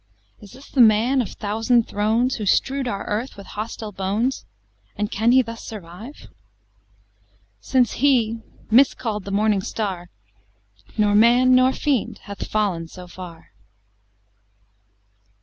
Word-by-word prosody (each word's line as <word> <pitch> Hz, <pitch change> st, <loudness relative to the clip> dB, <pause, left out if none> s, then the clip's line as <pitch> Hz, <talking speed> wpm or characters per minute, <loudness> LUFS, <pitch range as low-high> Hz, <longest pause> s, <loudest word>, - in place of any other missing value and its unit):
Is 205 Hz, 0 st, -14 dB
this 265 Hz, +2 st, -14 dB
the 260 Hz, -, +3 dB
man 230 Hz, +4 st, +4 dB
of 235 Hz, -, -4 dB
thousand 225 Hz, +3 st, +1 dB
thrones, 225 Hz, +5 st, 0 dB
Who 210 Hz, -3 st, -4 dB
strew'd 270 Hz, +6 st, +1 dB
our 200 Hz, -4 st, -4 dB
earth 220 Hz, +4 st, -3 dB
with 200 Hz, -, -10 dB
hostile 215 Hz, 0 st, -6 dB
bones, 205 Hz, +7 st, -2 dB, 0.5 s
And 210 Hz, -1 st, -3 dB
can 225 Hz, +4 st, +2 dB
he 260 Hz, +1 st, +5 dB
thus 230 Hz, -1 st, -8 dB
survive? 215 Hz, -, -10 dB, 1.3 s
Since 250 Hz, -, +1 dB
he, 235 Hz, -5 st, +3 dB, 0.3 s
miscall'd 225 Hz, -4 st, +2 dB
the -, -, -6 dB
Morning 205 Hz, 0 st, +2 dB
Star, 190 Hz, -4 st, -4 dB, 0.9 s
Nor 210 Hz, -1 st, +3 dB
man 240 Hz, +4 st, +5 dB
nor 255 Hz, +1 st, +5 dB
fiend 270 Hz, -4 st, -1 dB
hath 200 Hz, -1 st, -7 dB
fallen 195 Hz, -6 st, -1 dB
so 180 Hz, +2 st, -11 dB
far. 175 Hz, -2 st, -11 dB
220 Hz, 130 wpm, -22 LUFS, 205-250 Hz, 1.3 s, he